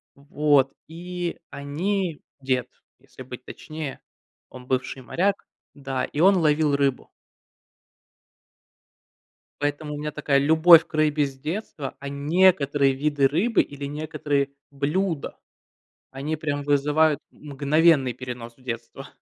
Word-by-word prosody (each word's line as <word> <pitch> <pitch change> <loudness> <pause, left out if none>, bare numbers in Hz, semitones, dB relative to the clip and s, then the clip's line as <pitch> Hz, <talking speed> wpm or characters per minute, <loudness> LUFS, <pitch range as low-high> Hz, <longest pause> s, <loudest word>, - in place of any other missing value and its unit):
вот. 140 -1 +2 0.2
И 175 +1 -5
они 165 +4 -2 0.2
дед, 130 -2 -1 0.3
если 130 0 -13
быть 125 0 -9
точнее. 155 -3 -7 0.5
Он 125 -1 -12
бывший 130 +1 -2
моряк, 195 +8 0 0.3
да, 135 -2 -3
и 145 - -6
он 195 +1 +6
ловил 150 -3 +2
рыбу. 140 -2 0 2.5
Поэтому 145 +1 -2
у - - -5
меня 150 0 -4
такая 145 -2 +1
любовь 160 +3 +7
к 170 - -28
рыбе 150 -1 +2
с 135 -1 -9
детства, 155 -2 -5
а 140 - -7
некоторые 145 -2 +3
виды 145 0 +1
рыбы 185 - +2
или 140 0 -7
некоторые 145 -1 -2 0.2
блюда- 150 +4 -2 0.8
они 145 +4 -3
прям 145 -2 -3
вызывают 145 +1 +2
мгновенный 145 -1 +2
перенос 120 -1 -8
в 130 - -23
детство. 120 +2 -7
145 Hz, 120 wpm, -24 LUFS, 135-160 Hz, 2.5 s, любовь